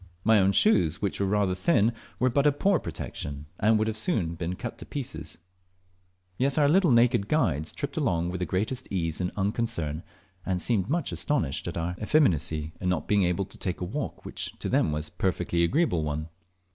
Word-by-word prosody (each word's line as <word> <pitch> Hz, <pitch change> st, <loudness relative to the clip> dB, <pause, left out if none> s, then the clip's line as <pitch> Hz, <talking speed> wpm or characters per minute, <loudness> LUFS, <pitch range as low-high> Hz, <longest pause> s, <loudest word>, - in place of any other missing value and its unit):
My 110 Hz, -1 st, +5 dB
own 95 Hz, 0 st, +4 dB
shoes, 90 Hz, -, +3 dB
which 100 Hz, -3 st, -2 dB
were 100 Hz, -, +1 dB
rather 100 Hz, -2 st, +1 dB
thin, 110 Hz, -, +2 dB, 0.2 s
were 130 Hz, +1 st, +2 dB
but 140 Hz, +4 st, +3 dB
a -, -, +6 dB
poor 180 Hz, +5 st, +2 dB
protection, 70 Hz, 0 st, -6 dB
and 110 Hz, +2 st, +4 dB
would 110 Hz, 0 st, 0 dB
soon 110 Hz, -, 0 dB
have 85 Hz, -, -7 dB
been 90 Hz, +1 st, -2 dB
cut 120 Hz, +3 st, -6 dB
to -, -, -8 dB
pieces; 80 Hz, -, -5 dB, 1.0 s
yet 135 Hz, +2 st, +1 dB
our 145 Hz, -2 st, +5 dB
little 175 Hz, +3 st, +4 dB
naked 115 Hz, -4 st, +4 dB
guides 85 Hz, -, +1 dB
tripped -, -, -5 dB
along 85 Hz, 0 st, +1 dB
with 90 Hz, -, -4 dB
the 90 Hz, -, -2 dB
greatest 110 Hz, +7 st, -1 dB
ease 85 Hz, -3 st, -1 dB
and 90 Hz, -, -1 dB
unconcern, 95 Hz, -7 st, -1 dB, 0.4 s
and 90 Hz, -1 st, -1 dB
seemed 105 Hz, +1 st, 0 dB
much 165 Hz, +1 st, 0 dB
astonished 140 Hz, -, -1 dB
at -, -, -4 dB
our 85 Hz, +2 st, -2 dB
effeminacy 80 Hz, -, +2 dB
in 90 Hz, -, 0 dB
not 90 Hz, -3 st, -1 dB
being 105 Hz, -1 st, +3 dB
able 90 Hz, +2 st, 0 dB
to 95 Hz, -, -8 dB
take 90 Hz, -2 st, -2 dB
a 90 Hz, -, -3 dB
walk 135 Hz, +11 st, -5 dB
which -, -, -5 dB
to -, -, -4 dB
them 80 Hz, -, +2 dB
was 75 Hz, +1 st, -1 dB
a -, -, -9 dB
perfectly 90 Hz, -1 st, 0 dB
agreeable 130 Hz, -, +2 dB
one. 75 Hz, +1 st, -3 dB
95 Hz, 200 wpm, -27 LUFS, 85-120 Hz, 1.0 s, a